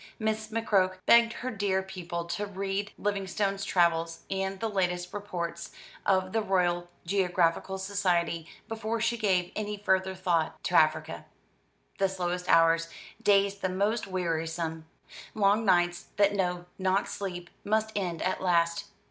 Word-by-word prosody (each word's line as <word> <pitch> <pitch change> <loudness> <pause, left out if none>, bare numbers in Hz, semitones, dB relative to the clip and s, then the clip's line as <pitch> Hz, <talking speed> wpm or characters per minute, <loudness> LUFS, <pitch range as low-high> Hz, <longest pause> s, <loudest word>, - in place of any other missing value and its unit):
Miss 220 0 -1
McCroke 200 -4 +1
begged 235 0 +6
her 255 - -1
dear 195 -3 0
pupil 175 -3 -5
to 175 +5 -3
read 200 +1 -3
Livingstone's 195 0 -1
travels 170 -3 +1
and 195 0 -2
the 225 - -1
latest 180 -3 -1
reports 180 -5 -4 0.4
of 185 -1 +2
the 225 - +2
Royal 175 -3 +1 0.2
Geographical 180 0 +1
Society, 180 -4 0 0.2
before 225 +1 -2
she 230 +1 +1
gave 190 -6 +1
any 210 -1 -3
further 190 -2 +1
thought 175 -4 0
to - - -3
Africa. 155 0 +2 0.7
The 195 0 +3
slowest 180 -1 -3
hours, 165 0 +5 0.3
days 200 0 +3
the 185 - -1
most 205 +5 0
wearisome, 165 -3 -2 0.5
long 210 +1 +3
nights 175 -2 +2
that 200 0 +4
know 180 -3 -1
not 190 +1 +1
sleep, 180 -3 -5
must 220 +1 +1
end 175 -5 -2
at 185 - -1
last. 170 -2 +2
190 Hz, 140 wpm, -29 LUFS, 175-200 Hz, 0.7 s, begged